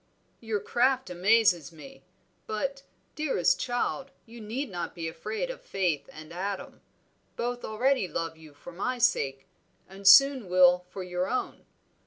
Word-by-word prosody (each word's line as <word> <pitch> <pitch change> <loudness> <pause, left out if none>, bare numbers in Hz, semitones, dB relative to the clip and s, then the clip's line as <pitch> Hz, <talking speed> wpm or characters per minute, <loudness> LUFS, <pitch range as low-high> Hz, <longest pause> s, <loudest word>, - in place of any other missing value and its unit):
"Your 220 -3 -2
craft 255 -1 +1
amazes 180 -3 +3
me. 270 - -13 0.5
But, 275 +6 -3 0.3
dearest 270 - +1
child, 245 +3 -2 0.2
you 235 0 -12
need 235 +4 -4
not 175 -2 -5
be 165 -2 -4
afraid 215 - -4
of - - -10
Faith 180 -7 -2
and 155 +2 -11
Adam. 195 +3 -5 0.5
Both 245 +1 -3
already 245 0 +1
love 165 -2 -4
you 155 -2 -16
for 160 - -11
my 245 +9 -3
sake, 135 - +1 0.4
and 195 +1 -6
soon 260 0 +7
will 180 0 +5
for 190 - -6
your 180 +1 -2
own. 255 - -3
200 Hz, 145 wpm, -28 LUFS, 175-245 Hz, 0.5 s, soon